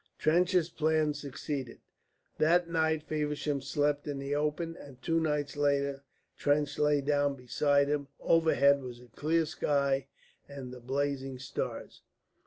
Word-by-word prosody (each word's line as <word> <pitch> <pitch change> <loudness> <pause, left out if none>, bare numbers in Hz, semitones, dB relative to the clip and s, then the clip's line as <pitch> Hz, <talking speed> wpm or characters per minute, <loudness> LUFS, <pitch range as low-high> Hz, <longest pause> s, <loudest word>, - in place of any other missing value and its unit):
Trench's 175 +2 +3
plan 155 -2 +1
succeeded. 140 -2 -5 0.6
That 170 +2 +4
night 160 -2 +1
Feversham 150 -2 -2
slept 145 +2 0
in 145 -1 -3
the 140 +1 -3
open, 150 +3 -1
and 140 -5 -12
two 165 +4 +1
nights 150 -2 -1
later 140 -1 +1 0.3
Trench 145 0 0
lay 150 -1 +3
down 145 0 +1
beside 140 +3 +2
him. 145 -1 -1
Overhead 140 -4 +4
was 125 -2 -8
a 125 0 -16
clear 160 +7 +1
sky 140 -2 0 0.4
and 135 -3 -8
the 125 - -9
blazing 135 +1 -2
stars. 130 - -5
145 Hz, 135 wpm, -31 LUFS, 140-155 Hz, 0.6 s, That